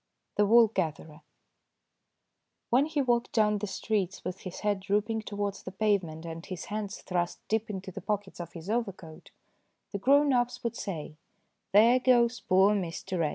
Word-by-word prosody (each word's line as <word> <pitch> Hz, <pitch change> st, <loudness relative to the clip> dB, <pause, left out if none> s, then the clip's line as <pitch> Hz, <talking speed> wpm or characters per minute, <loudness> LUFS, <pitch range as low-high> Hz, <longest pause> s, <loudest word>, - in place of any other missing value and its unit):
THE 210 Hz, -, +3 dB
WOOL 230 Hz, +1 st, +7 dB
GATHERER 160 Hz, -4 st, -3 dB, 1.5 s
WHEN 265 Hz, +5 st, +4 dB
he 305 Hz, -3 st, 0 dB
walked 240 Hz, -2 st, +1 dB
down 210 Hz, -2 st, +3 dB
the 210 Hz, -, -3 dB
streets 195 Hz, -2 st, -2 dB
with 180 Hz, +1 st, -4 dB
his 185 Hz, -2 st, -8 dB
head 205 Hz, -2 st, +1 dB
drooping 210 Hz, +3 st, 0 dB
towards 205 Hz, -2 st, -4 dB
the -, -, -7 dB
pavement 190 Hz, -6 st, 0 dB
and 165 Hz, 0 st, -6 dB
his 185 Hz, -4 st, -6 dB
hands 210 Hz, -2 st, -4 dB
thrust 175 Hz, -2 st, -2 dB
deep 220 Hz, +1 st, 0 dB
into 190 Hz, -2 st, -5 dB
the 195 Hz, -, -7 dB
pockets 205 Hz, -1 st, -3 dB
of 170 Hz, -1 st, -7 dB
his 165 Hz, 0 st, -9 dB
overcoat 195 Hz, -8 st, -4 dB, 0.6 s
the 200 Hz, -, -3 dB
grown 280 Hz, +5 st, +4 dB
ups 245 Hz, -1 st, 0 dB
would 235 Hz, 0 st, -2 dB
say, 160 Hz, -8 st, -5 dB, 0.5 s
"There 230 Hz, +5 st, +6 dB
goes 245 Hz, -1 st, +3 dB
poor 190 Hz, +3 st, +4 dB
Mr. 185 Hz, -1 st, -2 dB
X. 150 Hz, -, +1 dB
205 Hz, 165 wpm, -29 LUFS, 185-225 Hz, 1.5 s, WOOL